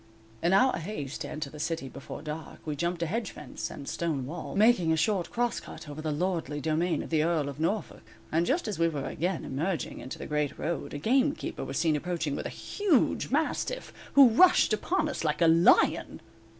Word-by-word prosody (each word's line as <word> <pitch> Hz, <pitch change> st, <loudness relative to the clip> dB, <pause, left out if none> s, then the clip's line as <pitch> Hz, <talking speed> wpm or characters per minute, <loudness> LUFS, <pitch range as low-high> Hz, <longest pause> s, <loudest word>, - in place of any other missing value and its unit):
In 170 Hz, -, +2 dB
our 225 Hz, +3 st, +4 dB
haste 155 Hz, -6 st, -5 dB
to -, -, -4 dB
enter 145 Hz, -3 st, -5 dB
the 150 Hz, -, -10 dB
city 165 Hz, -2 st, -2 dB
before 130 Hz, -, -9 dB
dark, 155 Hz, +1 st, -7 dB
we 150 Hz, -2 st, -2 dB
jumped 170 Hz, +3 st, -1 dB
a -, -, +1 dB
hedge 210 Hz, +5 st, -2 dB
fence, 125 Hz, -6 st, -7 dB
and 140 Hz, -, -9 dB
stone 155 Hz, -6 st, -2 dB
wall, 165 Hz, +7 st, -6 dB
making 200 Hz, -6 st, +4 dB
a 160 Hz, -, +2 dB
short 190 Hz, +1 st, +1 dB
cross 240 Hz, 0 st, 0 dB
cut -, -, -10 dB
over 150 Hz, +1 st, -7 dB
the 155 Hz, -1 st, -2 dB
lordly 165 Hz, -2 st, -1 dB
domain 160 Hz, +2 st, 0 dB
of -, -, -10 dB
the 155 Hz, -2 st, +3 dB
Earl 160 Hz, -3 st, +1 dB
of 140 Hz, +1 st, -6 dB
Norfolk, 195 Hz, +6 st, -2 dB, 0.3 s
and 165 Hz, +2 st, +2 dB
just 300 Hz, 0 st, +1 dB
as 205 Hz, -5 st, -3 dB
we 165 Hz, -, +4 dB
were 150 Hz, -4 st, -3 dB
again 180 Hz, +4 st, -2 dB
emerging 165 Hz, +5 st, -2 dB
into 130 Hz, -, -7 dB
the -, -, -7 dB
great 150 Hz, -1 st, -1 dB
road, 165 Hz, -2 st, -3 dB
a -, -, -2 dB
gamekeeper 265 Hz, -, 0 dB
was -, -, -4 dB
seen 160 Hz, -3 st, +2 dB
approaching 160 Hz, -2 st, -2 dB
with -, -, -3 dB
a -, -, -6 dB
huge 390 Hz, -, +1 dB
mastiff, 320 Hz, -, -1 dB, 0.2 s
who 275 Hz, -3 st, +9 dB
rushed 305 Hz, 0 st, +5 dB
upon 310 Hz, -, 0 dB
us 300 Hz, -, -4 dB
like 150 Hz, -1 st, 0 dB
a 170 Hz, -, +5 dB
lion. 165 Hz, +1 st, +4 dB
165 Hz, 210 wpm, -29 LUFS, 150-210 Hz, 0.3 s, who